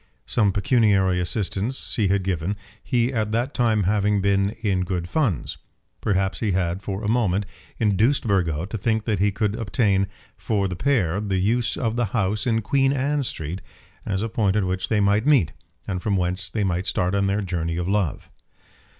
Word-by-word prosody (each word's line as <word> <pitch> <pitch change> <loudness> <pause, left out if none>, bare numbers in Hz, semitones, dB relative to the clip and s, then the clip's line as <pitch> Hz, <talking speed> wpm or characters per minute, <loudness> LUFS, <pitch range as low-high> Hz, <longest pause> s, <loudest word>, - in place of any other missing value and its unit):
Some 105 -4 +2
pecuniary 100 -4 +2
assistance 100 +6 -1
he 110 -7 +2
had 100 0 +1
given, 90 +1 -1 0.3
he 125 0 +1
at 110 -3 -1
that 120 +5 0
time 110 -4 +2
having 105 +1 +2
been 100 0 +2
in 95 -3 +1
good 90 -2 -3
funds. 120 - -1 0.4
Perhaps 95 -2 0
he 105 -4 0
had 90 0 -1
for 100 +1 -4
a - - -1
moment 105 -4 +1 0.3
induced 110 +6 +2
Burgo 85 -5 +1
to 105 +4 -5
think 110 +1 0
that 105 -5 0
he 100 +1 +3
could 105 0 -1
obtain 100 -3 +1 0.3
for 100 -3 -1
the 90 - -4
pair 100 -5 +1
the 100 -3 -1
use 115 +5 +1
of 115 -1 -1
the 120 - +2
house 105 +2 0
in 115 -2 +1
Queen 135 +3 +2
Anne 140 +2 0
Street 90 - -4 0.4
as 95 0 -2
a - - 0
point 105 -3 +1
at 105 - +2
which 95 +1 -2
they 110 -2 +2
might 100 +5 +2
meet, 135 - +4 0.3
and 90 -1 -2
from 100 -1 0
whence 90 +1 0
they 105 - -1
might 90 -1 -1
start 90 +1 0
on 100 0 +1
their 100 +2 0
journey 85 -3 -2
of 90 0 -2
love. 100 -6 -1
100 Hz, 190 wpm, -23 LUFS, 95-110 Hz, 0.4 s, meet